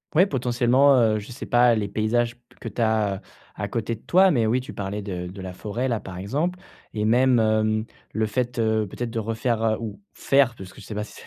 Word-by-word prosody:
Ouais, 180 +4 +6
potentiellement, 125 -1 +3
heu, 110 -2 +3
je 105 - -10
sais 120 - -7
pas 120 -1 +4
les 105 -2 -1
paysages 115 +3 0
p 120 - -35 0.2
que - - -7
tu - - -4
as, 110 -3 +1
heu, - - -11 0.3
à - - -4
côté 115 0 -2
de 115 - -8
toi. 190 +1 +4
Mais 115 -7 +2
oui, 125 +3 +2
tu 130 - -8
parlais 100 +1 -4
de 90 -3 -5
de 95 +2 -9
la 95 -1 -6
forêt 110 +7 -3
là, 115 -4 0
par 95 -2 -9
exemple. 145 - -2 0.4
Et 105 0 0
même, 125 +3 +4
hem, 110 0 +2 0.3
le 110 0 +1
fait, 120 +3 -2
heu, 110 -2 +1
peut-être 120 +4 -5
de 115 - -2
refaire, 115 +1 -1
heu, 110 -1 +2
ou 115 - -7
faire, 135 -3 +2
parce 95 -2 -10
que - - -13
je - - -12
sais 110 - -6
pas 105 - -2
si 105 - -12
115 Hz, 245 wpm, -24 LUFS, 105-125 Hz, 0.4 s, Ouais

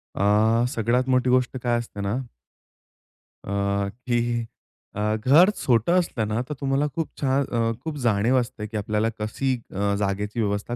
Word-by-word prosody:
अ, 110 +3 +3
सगळ्यात 120 +3 +1
मोठी 130 0 +3
गोष्ट 125 0 +2
काय 120 -1 +2
असते, 115 -3 -7
ना 100 +2 -1 1.3
अ, - - -4 0.6
की 120 -1 0 0.5
अ, 105 +1 0
घर 140 - +5
छोटं 120 +5 +2
असलं 120 -11 -2
ना 110 +2 -1
तर - - -2
तुम्हाला 135 +1 +1
खूप 165 +1 -2
छान 135 0 +2
अ, 115 -2 0
खूप 160 -2 -4
जाणीव 115 +3 +3
असते, 120 -3 -4
की 110 +1 -5
आपल्याला 105 +1 0
कशी 120 +5 -1 0.2
अ, 100 +1 0
जागेची 105 +3 -2
व्यवस्था 105 +2 -1
115 Hz, 155 wpm, -24 LUFS, 105-130 Hz, 1.3 s, घर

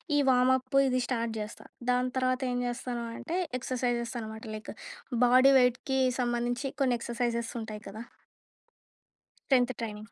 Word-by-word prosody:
ఈ - - +4
వార్మ్‌అప్ప్ 260 +2 +3
ఇది 255 0 +1
స్టార్ట్ 230 -3 -1
చేస్తా. 210 +1 -7 0.3
దాని 250 0 +1
తర్వాత 255 0 +1
ఏం 245 - -1
చేస్తాను 240 0 -4
అంటే, 340 +2 -3 0.2
ఎక్స్‌ర్‌సైజెస్ 245 -1 -2
అన్నమాట. 220 0 -7
లైక్, 215 - -7 0.5
బాడీ 255 +3 +6
వెయిట్‌కి 250 +2 +1 0.2
సంబంధించి 240 +2 -1
కొన్ని 255 -2 +3
ఎక్స్‌ర్‌సైజెస్ 235 0 -2
ఉంటాయి 215 -1 -7
కదా! 220 +3 -8 1.5
టెన్థ్ 250 0 +3
ట్రైనింగ్. 215 -1 -6
245 Hz, 130 wpm, -29 LUFS, 230-255 Hz, 1.5 s, బాడీ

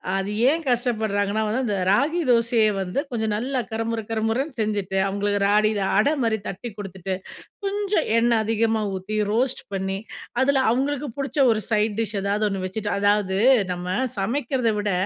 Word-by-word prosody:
அது 195 +1 -1 0.2
ஏன் 325 +3 +1
கஷ்டப்படுறாங்கன்னா 220 -4 0
வந்து 225 +5 0
அந்த 205 -4 -1
ராகி 285 - +2
தோசைய 230 -2 +4
வந்து 190 +7 -2
கொஞ்சம் 220 -4 -1
நல்லா 255 +4 -1
கருமுறு 225 0 -2
கரமுறன்னு 225 +6 -1
செஞ்சுட்டு, 205 -3 -1
அவங்களுக்கு 205 +1 -1
ராகில 210 0 +3 0.2
அட 215 +7 +4
மாதிரி 225 -2 +1
தட்டி 195 +5 -5
குடுத்துட்டு 190 -2 -5 0.5
கொஞ்சம் 405 +1 0
எண்ண 235 +1 +3
அதிகமா 225 0 +1
ஊத்தி, 200 +3 -4
ரோஸ்ட் 250 +3 0
பண்ணி 190 0 -2 0.4
அதுல 270 0 +3
அவங்களுக்கு 280 +3 -1
புடிச்ச 275 +1 -4
ஒரு 220 -1 0
சைட் 215 -1 +1
டிஷ் 215 -2 -1
எதாவது 200 +2 0
ஒன்னு 195 -1 -3
வச்சுட்டு 205 +3 -3
அதாவது 205 -1 +2 0.3
நம்ம 180 +1 -3 0.2
சமைக்கிறத 240 +3 0
விட, 205 -1 0
220 Hz, 150 wpm, -23 LUFS, 200-245 Hz, 0.5 s, தோசைய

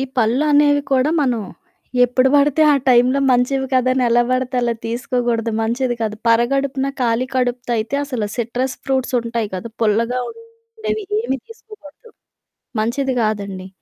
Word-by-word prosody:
ఈ - - 0
పళ్ళు 245 +4 +2
అనేవి 290 0 +4
కూడా 265 +3 +3
మనం 245 -5 0 0.6
ఎప్పుడు 255 +2 +2
బడితే 290 +1 +4
ఆ - - +4
టైంలో 250 +2 +4
మంచివి 265 +2 +1
కాదని 255 0 +2
ఎలా 240 +1 +4
బడతే 255 0 -1
అలా 235 -1 0
తీసుకోగూడదు, 235 -1 -1
మంచిది 240 +2 -1
కాదు. 215 -2 -1
పరగడుపున 270 +4 +1
ఖాళీ 240 +1 +1
కడుపుతో 250 -1 -1
అయితే 225 +5 -3
అసల 255 -6 -3
సిట్రస్ 245 +2 -2
ఫ్రూట్సుంటయి 240 -4 -1
కదా! 185 +5 -5
పుల్లగా 230 +3 +1
ఉండేవి 460 -1 -7 0.2
ఏమి 270 - -2
తీసుకోకూడదు. 445 -3 -15 0.7
మంచిది 260 +5 0
గాదండి. 200 -3 -3
255 Hz, 135 wpm, -19 LUFS, 235-275 Hz, 0.7 s, అనేవి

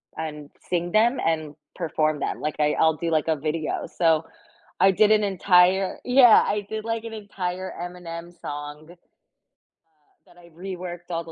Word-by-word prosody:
and 150 -2 -6 0.2
sing 175 0 -1
them 235 +5 +3
and 155 -2 -1 0.2
perform 155 -3 -1
them. - - -3
Like, 150 - -3
I 150 0 +2
I'll 160 -1 +3
do 170 - -2
like 155 -1 +1
a 160 - +2
video. 155 +1 -3
So 160 -2 +1 0.5
I 190 +1 +6
did 210 +3 +4
an 215 -1 +4
entire 190 -1 +3
Yeah, 250 -2 +7
I 205 -1 -2
did, 220 0 -5
like, 225 0 -2
an 225 - -7
entire 190 -3 -5
Eminem 175 -1 -7
song, 145 +1 -7
uh, - - -15 1.3
that - - -22
I 170 -1 -17
reworked 175 0 -8
all 170 -1 -2
the 165 - -10
175 Hz, 170 wpm, -24 LUFS, 160-195 Hz, 1.3 s, Yeah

